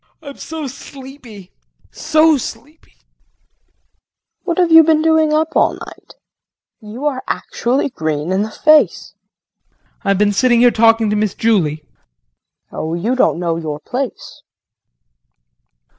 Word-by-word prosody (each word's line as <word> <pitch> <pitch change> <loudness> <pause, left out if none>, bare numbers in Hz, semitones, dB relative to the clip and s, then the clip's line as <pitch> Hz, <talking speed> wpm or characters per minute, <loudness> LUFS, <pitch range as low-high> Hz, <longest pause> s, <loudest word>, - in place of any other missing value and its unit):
I'm 280 -2 -10
so 320 -1 -7
sleepy, 260 -6 -12 0.4
so 310 0 +2
sleepy. 285 +4 -9
KRISTIN. - - -39 1.4
What 340 -3 -2
have 355 -2 +2
you 325 0 +8
been 310 0 +2
doing 320 -1 +2
up 310 +1 0
all - - +2
night? - - -13 0.6
You 225 +5 -9
are 270 -3 -1
actually 260 +4 -2
green 155 - -3
in 190 +1 0
the 215 - -3
face. 305 +7 +2 0.6
JEAN. - - -45 0.3
I - - -8
have 195 - +2
been 205 +1 +1
sitting 240 +2 +2
here 245 0 +5
talking 225 -1 +2
to - - 0
Miss 210 -2 -1
Julie. 185 -10 0 0.9
KRISTIN. - - -11
Oh 160 +1 -3
you 220 +9 -2
don't 255 - +1
know 170 -1 -2
your 155 -3 -5
place. 255 - -6
245 Hz, 145 wpm, -16 LUFS, 205-305 Hz, 1.4 s, you